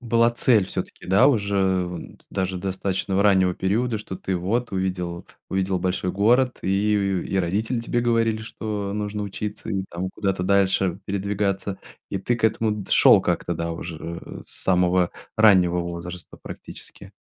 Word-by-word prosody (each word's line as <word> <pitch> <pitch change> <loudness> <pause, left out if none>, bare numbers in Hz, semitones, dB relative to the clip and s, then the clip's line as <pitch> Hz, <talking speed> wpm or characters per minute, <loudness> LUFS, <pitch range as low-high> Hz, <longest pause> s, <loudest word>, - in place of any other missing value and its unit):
была 115 -1 +3
цель 120 -4 +3
всё-таки, - - -6
да 100 +8 +5
уже 100 -7 +2
вон 90 -1 -8
т - - -26
даже 95 -1 -2
достаточного 95 +1 -1
раннего 95 -3 +4
периода, 110 +4 0
что 95 -3 -7
ты 95 0 -2
вот 110 +8 -1
увидел, 90 -2 -3 0.2
увидел 95 -1 0
большой 90 0 -1
город, 120 +6 +3
и, 100 +3 +1
э, 100 -2 0
и 95 - -2
родители 105 +7 0
тебе 120 +1 -1
говорили, 115 -2 +1
что 105 -3 -4
нужно 105 0 -3
учиться 105 +2 -5
и 95 -2 -1
там 90 +2 -3
куда-то 95 -3 -2
дальше 95 -1 +2
передвигаться, 100 0 -2 0.3
и - - -2
ты 120 +6 0
к 110 - -4
этому 110 0 +2
д 105 -2 -6
шёл - - +7
как-то - - -1
да 85 0 -3
уже 85 0 -7
с - - -9
самого 90 -1 +3 0.3
раннего 90 -5 +5
возраста, 85 0 -7
практически. - - -10
95 Hz, 160 wpm, -24 LUFS, 90-105 Hz, 0.3 s, шёл